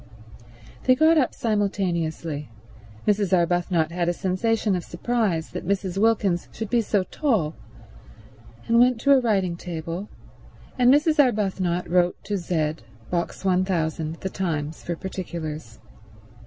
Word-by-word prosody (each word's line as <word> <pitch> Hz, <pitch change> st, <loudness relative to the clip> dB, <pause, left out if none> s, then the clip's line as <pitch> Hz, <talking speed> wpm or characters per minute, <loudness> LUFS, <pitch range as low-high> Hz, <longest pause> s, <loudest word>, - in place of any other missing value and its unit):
They 255 Hz, -, +6 dB
got 315 Hz, +3 st, +5 dB
up 260 Hz, -, 0 dB
simultaneously—Mrs. 165 Hz, -, -2 dB
Arbuthnot 170 Hz, -1 st, +1 dB
had 175 Hz, 0 st, 0 dB
a -, -, +1 dB
sensation 200 Hz, +3 st, 0 dB
of 175 Hz, -, -3 dB
surprise 185 Hz, -3 st, -1 dB
that 180 Hz, -, -5 dB
Mrs. 195 Hz, -1 st, -1 dB
Wilkins 205 Hz, -5 st, +2 dB
should 220 Hz, -2 st, -6 dB
be 240 Hz, -1 st, +3 dB
so 205 Hz, -3 st, +1 dB
tall—and 150 Hz, -, -3 dB
went 245 Hz, -1 st, +4 dB
to 280 Hz, -, +3 dB
a 275 Hz, -, +7 dB
writing 195 Hz, -7 st, +1 dB
table, 170 Hz, +3 st, -5 dB, 0.7 s
and 250 Hz, 0 st, +6 dB
Mrs. 300 Hz, +2 st, +3 dB
Arbuthnot 190 Hz, -7 st, 0 dB
wrote 180 Hz, 0 st, +2 dB
to 205 Hz, -, -2 dB
Z, 160 Hz, -4 st, -1 dB, 0.3 s
Box 175 Hz, +2 st, -2 dB
1000, 170 Hz, -4 st, 0 dB
The 190 Hz, -, -2 dB
Times, 160 Hz, -5 st, -3 dB
for 170 Hz, -, -3 dB
particulars. 160 Hz, -, -6 dB
180 Hz, 125 wpm, -24 LUFS, 165-210 Hz, 0.7 s, a